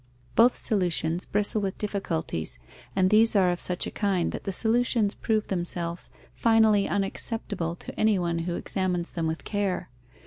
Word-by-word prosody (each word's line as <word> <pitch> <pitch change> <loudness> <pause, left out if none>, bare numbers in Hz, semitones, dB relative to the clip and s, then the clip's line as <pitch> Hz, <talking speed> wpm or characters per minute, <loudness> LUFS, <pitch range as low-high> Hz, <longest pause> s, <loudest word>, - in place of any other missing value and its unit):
Both 240 +2 +6
solutions 175 -4 0
bristle 210 +1 +1
with 195 -2 -3
difficulties, 170 - -2 0.4
and 185 0 +3
these 225 +1 +5
are 185 -3 +4
of 175 - -3
such 180 0 0
a - - -5
kind 195 -5 0
that - - -7
the 195 - -1
solutions 225 0 +2
prove 220 -2 0
themselves 175 -2 -3 0.2
finally 220 -3 +3
unacceptable 195 -3 -2
to - - -10
anyone 180 -6 +2
who 175 - -2
examines 180 -3 -2
them 165 -2 -2
with 160 +1 -3
care. 205 -7 -2
195 Hz, 150 wpm, -27 LUFS, 175-215 Hz, 0.4 s, Both